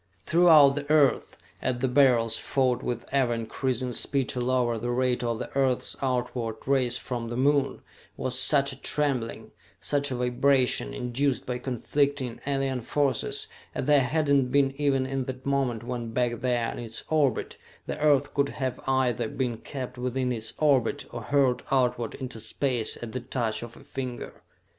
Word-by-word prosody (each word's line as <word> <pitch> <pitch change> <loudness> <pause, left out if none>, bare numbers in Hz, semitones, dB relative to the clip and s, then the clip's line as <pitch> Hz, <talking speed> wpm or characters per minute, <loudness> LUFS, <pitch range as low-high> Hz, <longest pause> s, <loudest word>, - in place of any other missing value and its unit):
Throughout 160 -5 +6
the 145 0 -5
Earth, 150 -3 +3 0.2
as 130 -1 -1
the 130 +2 0
Beryls 125 -4 +4
fought 130 -2 0
with 120 -2 -3
ever 130 -4 +2
increasing 125 +2 -2
speed 135 +3 0
to 125 - -2
lower 120 -2 +1
the 120 - -3
rate 125 0 0
of 115 -1 -1
the - - -7
earth's 135 -2 +1
outward 125 -3 -1
race 130 -3 +2
from 120 -2 -4
the 120 - -4
Moon, 140 +1 +1 0.3
was 130 0 +2
such 140 +1 +4
a 135 - -13
trembling, 135 -6 -2 0.3
such 145 0 0
a 130 - -2
vibration 125 +1 +2
induced 125 +2 -1
by 125 0 -3
conflicting, 135 0 -1
alien 135 -2 -1
forces 135 +1 -1 0.3
as - - -2
there 145 -1 +5
had 150 +4 0
not 140 -3 +3
been 135 0 +2
even 135 -2 +2
in 135 -1 -2
that 130 0 -7
moment 135 -5 0
when 120 -2 -5
back 120 -1 0
there 120 -2 0
in - - -7
its 115 -1 -6
orbit, 145 -6 +1 0.3
the - - -5
Earth 145 -2 +3
could 140 0 +1
have 130 -3 -3
either 130 -4 +1
been 125 -3 -2
kept 130 -3 -7
within 125 0 -1
its 115 -2 -2
orbit, 140 -6 +2
or 120 - -6
hurled 135 +1 +2
outward 125 -3 +1
into 130 -4 -7
space 120 +1 -1
at 115 - -6
the 130 - -3
touch 115 -3 -2
of 120 0 -9
a - - -14
finger. 130 -3 -6
130 Hz, 170 wpm, -27 LUFS, 120-140 Hz, 0.3 s, Throughout